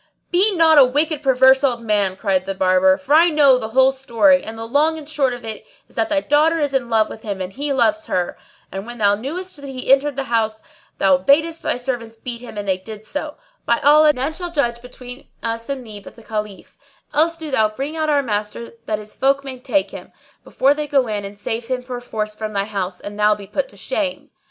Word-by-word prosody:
"Be 385 Hz, +4 st, +4 dB
not 320 Hz, -3 st, +6 dB
a -, -, +9 dB
wicked, 295 Hz, +4 st, +1 dB
perverse 265 Hz, 0 st, +4 dB
old 240 Hz, -4 st, 0 dB
man!" 205 Hz, -4 st, +1 dB
cried 190 Hz, -2 st, -1 dB
the 195 Hz, -, -3 dB
Barber, 185 Hz, 0 st, +3 dB
"for 280 Hz, +1 st, -2 dB
I 335 Hz, +3 st, +6 dB
know 285 Hz, -5 st, +5 dB
the 220 Hz, -, -4 dB
whole 260 Hz, +4 st, +4 dB
story; 270 Hz, +1 st, +2 dB
and 225 Hz, +1 st, -8 dB
the 225 Hz, -, -6 dB
long 300 Hz, +7 st, +1 dB
and 300 Hz, -2 st, -9 dB
short 290 Hz, -4 st, 0 dB
of 245 Hz, -1 st, -7 dB
it 220 Hz, -1 st, -5 dB, 0.2 s
is -, -, -22 dB
that 225 Hz, -, 0 dB
thy 300 Hz, -2 st, +1 dB
daughter 305 Hz, +3 st, +3 dB
is 290 Hz, -3 st, -1 dB
in 250 Hz, -3 st, -1 dB
love 220 Hz, -2 st, +3 dB
with 220 Hz, -, -10 dB
him 200 Hz, -3 st, -5 dB
and 185 Hz, 0 st, -5 dB
he 285 Hz, +2 st, -3 dB
loves 315 Hz, +4 st, +1 dB
her; 180 Hz, -1 st, -1 dB, 0.4 s
and 195 Hz, +3 st, -6 dB
when 240 Hz, 0 st, -8 dB
thou 205 Hz, -2 st, +3 dB
knewest 310 Hz, -, -5 dB
that 285 Hz, -, -11 dB
he 255 Hz, -1 st, -7 dB
had 265 Hz, -, +7 dB
entered 290 Hz, 0 st, -4 dB
the 275 Hz, -, -2 dB
house, 220 Hz, -3 st, -1 dB, 0.3 s
thou 190 Hz, -2 st, +3 dB
badest 320 Hz, -, +2 dB
thy -, -, -1 dB
servants 245 Hz, -3 st, -4 dB
beat 235 Hz, +1 st, -5 dB
him 235 Hz, -3 st, -10 dB
and 205 Hz, -1 st, -5 dB
they 190 Hz, -1 st, 0 dB
did 215 Hz, +2 st, -10 dB
so: 295 Hz, +4 st, -5 dB, 0.3 s
by 235 Hz, -, +3 dB
Allah, 300 Hz, +1 st, +6 dB
none 280 Hz, +2 st, -3 dB
shall 350 Hz, +1 st, -5 dB
judge 240 Hz, -8 st, -1 dB
between 250 Hz, +1 st, -11 dB, 0.2 s
us 230 Hz, +1 st, -4 dB
and 270 Hz, -3 st, -4 dB
thee 210 Hz, -2 st, -9 dB
but 200 Hz, -, -14 dB
the 230 Hz, -, -16 dB
Caliph; 210 Hz, -2 st, -6 dB, 0.3 s
or -, -, 0 dB
else 330 Hz, +1 st, +3 dB
do 315 Hz, -2 st, -7 dB
thou 220 Hz, -5 st, +3 dB
bring 275 Hz, +8 st, -5 dB
out 315 Hz, -1 st, -1 dB
our 290 Hz, -1 st, +2 dB
master 210 Hz, 0 st, -4 dB, 0.2 s
that 215 Hz, -, 0 dB
his 210 Hz, 0 st, -10 dB
folk 275 Hz, +1 st, +1 dB
may 260 Hz, -2 st, -7 dB
take 280 Hz, +4 st, -1 dB
him, -, -, -10 dB, 0.3 s
before 275 Hz, +2 st, +2 dB
they 300 Hz, 0 st, -4 dB
go 275 Hz, -3 st, +2 dB
in 210 Hz, -3 st, -3 dB
and 200 Hz, +1 st, -9 dB
save 225 Hz, +3 st, -4 dB
him 255 Hz, 0 st, -2 dB
perforce 245 Hz, -4 st, -5 dB
from 215 Hz, 0 st, -6 dB
thy 200 Hz, 0 st, 0 dB
house, 190 Hz, -3 st, -4 dB
and 205 Hz, +1 st, -8 dB
thou 210 Hz, 0 st, +4 dB
be 200 Hz, -1 st, -10 dB
put 240 Hz, +8 st, -3 dB
to 200 Hz, -, -15 dB
shame." 275 Hz, +6 st, -3 dB
250 Hz, 240 wpm, -20 LUFS, 215-290 Hz, 0.4 s, a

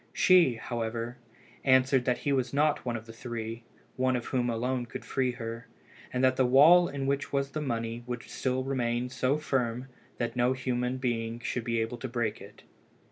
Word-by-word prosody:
She, 175 Hz, -9 st, +5 dB
however, 115 Hz, +1 st, -4 dB, 0.4 s
answered 130 Hz, -1 st, +4 dB
that 125 Hz, -1 st, +2 dB
he 140 Hz, -, -1 dB
was 130 Hz, -1 st, -1 dB
not 150 Hz, +1 st, +2 dB
one 120 Hz, -2 st, -2 dB
of 110 Hz, -1 st, -6 dB
the 115 Hz, -, -11 dB
three, 115 Hz, -1 st, -6 dB, 0.3 s
one 130 Hz, 0 st, +2 dB
of 120 Hz, -, -3 dB
whom 125 Hz, -2 st, 0 dB
alone 120 Hz, +2 st, -1 dB
could -, -, -8 dB
free 130 Hz, -2 st, 0 dB
her, 115 Hz, -1 st, -6 dB, 0.4 s
and 125 Hz, +1 st, -1 dB
that 130 Hz, 0 st, +4 dB
the 130 Hz, -, +4 dB
wall 160 Hz, +7 st, +7 dB
in 140 Hz, -1 st, -4 dB
which 140 Hz, +1 st, -1 dB
was 140 Hz, 0 st, -1 dB
the 155 Hz, -, -3 dB
money 115 Hz, -3 st, -3 dB
would 120 Hz, -1 st, -4 dB
still 130 Hz, 0 st, -2 dB
remain 125 Hz, -2 st, -1 dB
so 130 Hz, +2 st, +1 dB
firm 130 Hz, -4 st, -1 dB, 0.3 s
that 120 Hz, 0 st, -2 dB
no 125 Hz, +1 st, +3 dB
human 125 Hz, -1 st, -1 dB
being 115 Hz, -2 st, -2 dB
should 120 Hz, +1 st, -2 dB
be 115 Hz, 0 st, 0 dB
able 115 Hz, +2 st, -3 dB
to 130 Hz, -, -4 dB
break 120 Hz, -3 st, -2 dB
it. -, -, -13 dB
125 Hz, 190 wpm, -29 LUFS, 120-130 Hz, 0.4 s, wall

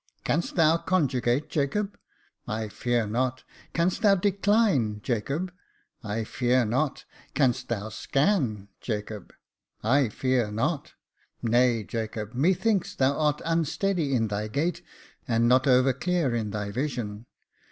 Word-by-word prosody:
Canst 165 Hz, +3 st, -1 dB
thou 165 Hz, -1 st, +5 dB
conjugate, 135 Hz, -7 st, +1 dB
Jacob? 195 Hz, +8 st, -1 dB, 0.5 s
I 110 Hz, 0 st, -3 dB
fear 120 Hz, +1 st, 0 dB
not. 125 Hz, +4 st, -1 dB, 0.3 s
Canst 175 Hz, +5 st, +1 dB
thou 205 Hz, -3 st, +6 dB
decline, 195 Hz, -, +2 dB
Jacob? 140 Hz, -, -2 dB, 0.5 s
I 110 Hz, +1 st, -2 dB
fear 125 Hz, +2 st, +1 dB
not. 130 Hz, +6 st, -1 dB, 0.3 s
Canst 135 Hz, -4 st, +2 dB
thou 110 Hz, -2 st, -3 dB
scan, 120 Hz, -, 0 dB
Jacob? 105 Hz, -3 st, -5 dB, 0.5 s
I 130 Hz, +2 st, +3 dB
fear 125 Hz, -1 st, 0 dB
not. 110 Hz, +2 st, -2 dB, 0.5 s
Nay, 120 Hz, -1 st, +3 dB
Jacob, 110 Hz, +1 st, -4 dB
methinks 185 Hz, -, +1 dB
that 130 Hz, -, +2 dB
thou 140 Hz, -, -4 dB
art 150 Hz, -1 st, +1 dB
unsteady 165 Hz, -1 st, 0 dB
in 115 Hz, -3 st, +1 dB
thy 105 Hz, +1 st, -2 dB
gait, 165 Hz, +10 st, -1 dB, 0.5 s
and 115 Hz, 0 st, +2 dB
not 130 Hz, +3 st, +4 dB
over 130 Hz, 0 st, +5 dB
clear 170 Hz, -2 st, 0 dB
in 110 Hz, -3 st, -1 dB
thy 105 Hz, 0 st, -4 dB
vision. 120 Hz, -3 st, -3 dB
130 Hz, 130 wpm, -27 LUFS, 110-160 Hz, 0.5 s, thou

